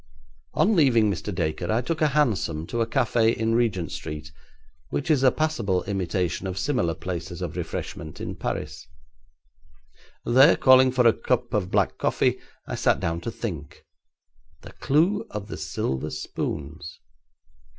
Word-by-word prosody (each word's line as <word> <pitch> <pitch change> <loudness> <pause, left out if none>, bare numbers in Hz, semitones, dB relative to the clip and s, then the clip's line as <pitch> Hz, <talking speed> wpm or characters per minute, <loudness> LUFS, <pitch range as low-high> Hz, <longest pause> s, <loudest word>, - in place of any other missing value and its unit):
On 215 +2 +3
leaving 120 - +4
Mr. 105 - -4
Dacre 85 0 -2
I 110 +3 +2
took 155 +5 -3
a 155 - +5
hansom 115 - 0
to 120 +6 -2
a 115 - +1
café 115 -2 +2
in 115 +1 0
Regent 110 -8 0
Street, 75 -1 -6 0.6
which 145 +3 -1
is 145 -4 +3
a 135 - +6
passable 115 - 0
imitation 95 -2 -2
of 95 0 -5
similar 105 - 0
places 90 -2 -5
of - - -5
refreshment 80 -1 -5
in - - -5
Paris. - - -5 1.4
There, 135 +6 +6
calling 130 0 +6
for 125 -1 +2
a 115 - +7
cup 125 -1 -1
of 100 -4 0
black - - +1
coffee, - - +1 0.3
I - - -5
sat - - +2
down 85 +1 -2
to 115 - -4
think. 85 - -6 0.8
The - - -11
clue 170 +9 +1
of 105 -1 -6
the - - -5
silver 65 +3 -3
spoons! 75 +1 -5
110 Hz, 150 wpm, -25 LUFS, 85-130 Hz, 1.4 s, a